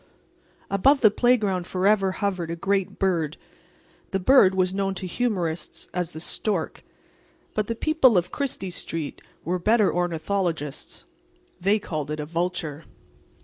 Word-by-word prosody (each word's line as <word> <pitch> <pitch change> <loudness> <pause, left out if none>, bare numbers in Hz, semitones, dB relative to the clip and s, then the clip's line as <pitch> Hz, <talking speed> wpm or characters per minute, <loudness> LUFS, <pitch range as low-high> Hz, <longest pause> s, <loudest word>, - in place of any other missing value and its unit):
Above 265 +9 +4
the 215 -4 +7
playground 210 -7 +2
forever 195 +1 +2
hovered 185 -4 -2
a 170 - -2
great 195 +2 -1
bird. 170 -5 0 0.7
The 195 - -1
bird 195 -2 +5
was 185 0 +1
known 195 0 -1
to 185 - -4
humorists 180 -5 -2
as 180 -2 -1
the 160 - -7
stork. 180 +1 -3 0.7
But 215 -1 -1
the 230 - -2
people 265 -5 +4
of 180 +1 0
Chrystie 245 -10 -3
street 165 -3 -4 0.2
were 180 +3 0
better 215 +2 +3
ornithologists. 170 -3 -2 0.5
They 200 +4 +3
called 155 -8 -4
it 150 0 -3
a 150 - -3
vulture. 165 -2 -3
185 Hz, 140 wpm, -25 LUFS, 170-205 Hz, 0.7 s, the